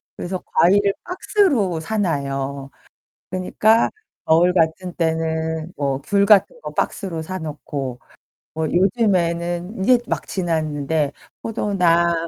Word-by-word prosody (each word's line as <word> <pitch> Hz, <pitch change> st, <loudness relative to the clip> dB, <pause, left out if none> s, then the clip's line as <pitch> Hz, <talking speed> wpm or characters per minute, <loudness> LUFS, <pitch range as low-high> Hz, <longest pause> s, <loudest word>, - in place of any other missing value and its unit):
그래서 180 Hz, +1 st, -4 dB
과일을 200 Hz, +2 st, +3 dB
박스로 300 Hz, -, +1 dB
사 215 Hz, +8 st, -3 dB
놔요. 140 Hz, -6 st, -2 dB, 0.6 s
그니까 210 Hz, +5 st, +2 dB, 0.4 s
겨울 170 Hz, +3 st, +4 dB
같은 175 Hz, +1 st, 0 dB
때는 160 Hz, 0 st, -1 dB
뭐 140 Hz, -2 st, -1 dB
귤 200 Hz, +6 st, +2 dB
같은 220 Hz, -, +4 dB
거 -, -, -6 dB
박스로 170 Hz, -5 st, -2 dB
사 185 Hz, +4 st, -5 dB
놓고 145 Hz, -5 st, -5 dB, 0.5 s
뭐 160 Hz, 0 st, -1 dB
요즘에는 180 Hz, -1 st, +1 dB
이제 250 Hz, +4 st, +5 dB
막 -, -, -3 dB
지났는데 155 Hz, -4 st, -1 dB, 0.3 s
포도나 180 Hz, -6 st, +2 dB
170 Hz, 230 characters per minute, -21 LUFS, 160-195 Hz, 0.6 s, 이제